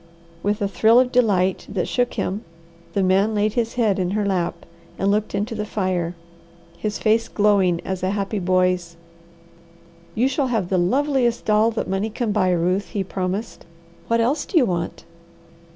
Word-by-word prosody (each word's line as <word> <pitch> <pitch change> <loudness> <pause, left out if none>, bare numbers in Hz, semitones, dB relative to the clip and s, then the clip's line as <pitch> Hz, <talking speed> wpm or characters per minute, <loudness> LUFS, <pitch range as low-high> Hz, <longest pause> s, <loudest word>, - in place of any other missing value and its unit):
With 205 +2 -1
a - - +2
thrill 225 +4 +4
of 250 -1 +2
delight 195 -7 +2
that 190 -3 -2
shook 245 -1 0
him, 200 +4 -2 0.5
the 200 - +1
man 195 +4 +2
laid 210 0 +1
his 230 -1 -1
head 215 -5 +1
in 180 -1 0
her 210 - 0
lap 185 -3 -2 0.3
and 195 +1 +1
looked 210 0 -1
into 210 +4 -2
the 210 -1 -3
fire, 185 -5 -2 0.6
his 210 +4 -3
face 225 +1 +2
glowing 200 -5 +2
as 190 -1 -3
a 185 - 0
happy 200 +1 -2
boy's. 180 -2 +1 1.2
"You 245 +4 +2
shall 270 0 0
have 220 -8 -1
the 185 - +2
loveliest 250 +4 +1
doll 215 +1 +4
that - - -1
money 195 +3 -1
can 220 0 -2
buy, 195 -3 +2
Ruth," 180 +3 +1
he 205 -3 -3
promised. 190 +2 -4 0.4
"What 230 0 +2
else 270 +6 +1
do 360 - 0
you 275 - +5
want?" 170 -4 -3
205 Hz, 175 wpm, -22 LUFS, 185-225 Hz, 1.2 s, you